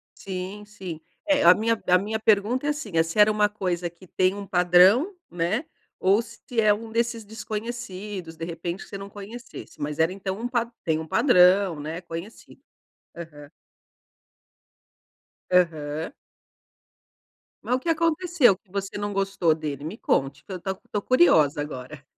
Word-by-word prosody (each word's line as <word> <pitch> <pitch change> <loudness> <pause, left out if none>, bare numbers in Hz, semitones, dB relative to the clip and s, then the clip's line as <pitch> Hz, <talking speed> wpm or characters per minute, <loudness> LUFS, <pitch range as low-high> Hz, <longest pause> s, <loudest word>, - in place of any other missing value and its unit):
Sim, 195 +2 -6
sim. 185 -6 -8 0.3
É, 290 0 +3
a - - +9
minha 225 +1 0
a 180 - +6
minha 215 +4 -2
pergunta 220 +5 +2
é - - +2
assim: 295 -9 -3
se 165 +6 -4
era 210 +1 +7
uma 210 -1 +2
coisa 180 -4 -2
que 175 +2 -18
tem 185 +2 +1
um 200 -1 -6
padrão, 185 - +5
né, 180 - -1 0.3
ou 195 +4 +4
se - - -13 0.2
é 210 -1 +5
um 220 +1 -7
desses 230 -1 -1
desconhecidos, 210 -5 -6
de 165 - -5
repente 170 +2 -5
você 200 - -7
não 195 0 -8
conhecesse? 210 +5 -10
Mas 150 +1 -4
era, 160 +2 +3
então, 195 0 -4
um 240 - -2
pa 240 -1 0 0.2
tem 160 -1 0
um 160 - -6
padrão, 180 - +4
né, 160 +4 -5
conhecido. 170 +5 -9 0.6
Aham. 150 -4 -10 2.0
Aham. 160 -3 +1 1.5
Mas 250 - +1
o 255 - -1
que 335 - -4
aconteceu 330 - +3
que 190 -2 -31
você 200 0 -4
não 205 0 -3
gostou 195 -4 +1
dele? 145 -3 -5
Me 165 +8 -6
conte, 135 - 0
pra 190 - -7
eu - - -6
tô 190 +1 -3 0.2
tô 205 - -1
curiosa 160 - +4
agora. 140 0 -7
195 Hz, 160 wpm, -25 LUFS, 170-220 Hz, 2.0 s, a